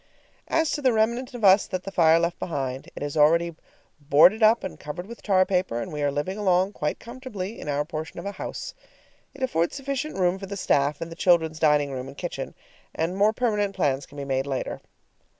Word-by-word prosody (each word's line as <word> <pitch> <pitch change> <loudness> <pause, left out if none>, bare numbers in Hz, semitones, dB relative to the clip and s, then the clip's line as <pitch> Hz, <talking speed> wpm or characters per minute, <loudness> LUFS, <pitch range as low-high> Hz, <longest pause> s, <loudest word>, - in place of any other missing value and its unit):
As 325 -1 +1
to 295 - -2
the 260 -3 +3
remnant 235 +4 0
of 235 - -7
us 195 +1 +6
that 185 -1 -4
the 195 - -6
fire 165 -3 +5
left 170 +1 -1
behind, 135 -5 -4
it - - -5
is 145 +1 -4
already 165 +3 +4 0.5
boarded 155 +9 +5
up 220 +2 +5
and 190 - -6
covered 150 +4 -6
with 235 +3 -11
tar 185 -2 +3
paper, 180 -11 0
and 120 - -5
we 150 - -3
are 145 - +2
living 165 +9 -3
along 190 -1 +2
quite 150 -5 -2
comfortably 230 -4 -7
in - - -6
our 145 +1 0
portion 155 0 -6
of 170 - -8
a 200 - -2
house. 195 - -6 0.6
It 270 - -6
affords 170 -10 0
sufficient 275 +1 -3
room 185 0 +1
for 195 - -7
the 200 +1 -5
staff 145 -5 +1
and 165 0 -5
the - - -7
children's 160 -3 +2
dining 150 -2 +3
room 130 -1 -5
and 135 +1 -11
kitchen, 150 -7 -5 0.4
and 165 +3 -1
more 205 +2 +4
permanent 210 -4 0
plans 140 -6 0
can 145 - -14
be 140 - -4
made 135 0 -1
later. 135 -2 -3
175 Hz, 220 wpm, -25 LUFS, 150-205 Hz, 0.6 s, us